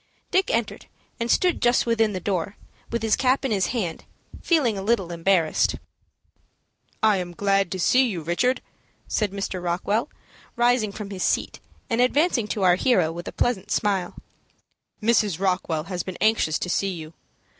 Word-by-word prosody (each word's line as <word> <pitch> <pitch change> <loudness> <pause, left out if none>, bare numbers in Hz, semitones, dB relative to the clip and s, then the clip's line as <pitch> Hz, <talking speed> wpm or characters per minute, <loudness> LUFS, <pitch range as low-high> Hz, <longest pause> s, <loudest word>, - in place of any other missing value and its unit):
Dick 380 +1 +2
entered, 230 0 -2 0.3
and 235 0 -2
stood 360 +5 +2
just 240 0 +3
within 225 -2 +2
the 185 - -3
door, 190 +1 -2 0.3
with 235 -1 -3
his 220 -1 +3
cap 260 +1 +1
in 265 - -1
his 195 -3 +1
hand, 185 -10 -3 0.4
feeling 285 - +2
a 195 - -4
little 195 -4 0
embarrassed. 170 -1 +2 1.3
"I 215 -2 +5
am 175 -1 -5
glad 195 -2 +1
to 185 - -3
see 255 +8 +4
you, 180 -8 -4
Richard," 245 +11 0 0.4
said 210 -3 0
Mr. 195 -2 -4
Rockwell, 200 - -1 0.5
rising 240 -3 +2
from 205 0 -7
his 190 -2 -6
seat, - - 0 0.3
and 235 0 +1
advancing 255 -2 +2
to 205 -1 -2
our 180 -1 +5
hero 185 -9 +2
with 175 +1 -7
a - - -4
pleasant 215 -5 -1
smile. 195 -4 0 0.9
"Mrs. 210 -6 +2
Rockwell 180 -5 0
has 180 +1 -4
been 185 +1 -7
anxious 215 -8 +2
to - - -4
see 195 - 0
you. 160 -3 -7
200 Hz, 165 wpm, -24 LUFS, 180-235 Hz, 1.3 s, I